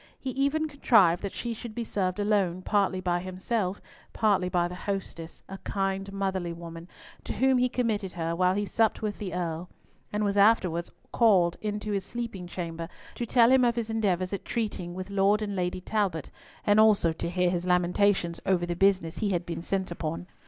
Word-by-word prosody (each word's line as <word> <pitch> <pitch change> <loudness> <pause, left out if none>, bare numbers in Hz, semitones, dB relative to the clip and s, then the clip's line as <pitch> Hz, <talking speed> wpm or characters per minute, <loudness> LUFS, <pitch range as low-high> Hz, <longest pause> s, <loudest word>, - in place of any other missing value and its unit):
He 265 - -4
even 280 +4 +1
contrived 215 - +4
that 200 - -3
she 235 -1 -4
should 225 -1 -8
be 235 - -2
served 190 -3 -2
alone, 195 -4 +1
partly 195 -2 +1
by 175 -1 0
himself, 185 +2 -2 0.3
partly 195 -4 +2
by 175 -1 +1
the 175 - -8
hostess, 180 -3 -5
a 195 0 -8
kind 195 0 -2
motherly 190 -3 -2
woman, 165 0 -9 0.4
to - - -4
whom 260 +1 +3
he 250 0 +2
committed 220 -6 -1
her, 165 -1 -2
while 180 +1 +2
he 205 +1 0
supped 220 +1 +1
with 210 -2 -3
the 195 -3 -4
Earl, 170 0 -3 0.4
and 210 0 -1
was 200 0 0
afterwards 185 -5 +3 0.2
called 185 -7 +4
into 210 0 -3
his 200 -2 -1
sleeping 225 -5 -5
chamber 170 -2 -5 0.2
to 240 - -4
tell 235 +1 +5
him 260 -1 +5
of 240 -1 +3
his 230 -2 -2
endeavours 190 -4 0
at 200 - -3
treating 205 -7 -3
with 185 +2 -6
Lord 200 +1 +3
and 205 -1 -3
Lady 180 0 -2
Talbot, 190 -6 -1 0.3
and 205 0 +4
also 210 -6 +5
to 165 - -4
hear 180 0 +1
his 175 0 -2
lamentations 180 0 +2
over 180 -2 +1
the 175 0 -3
business 190 -3 +2
he 210 - 0
had 175 -2 -1
been 165 -1 -4
sent 190 +1 -2
upon. 165 0 -4
195 Hz, 195 wpm, -28 LUFS, 175-215 Hz, 0.4 s, tell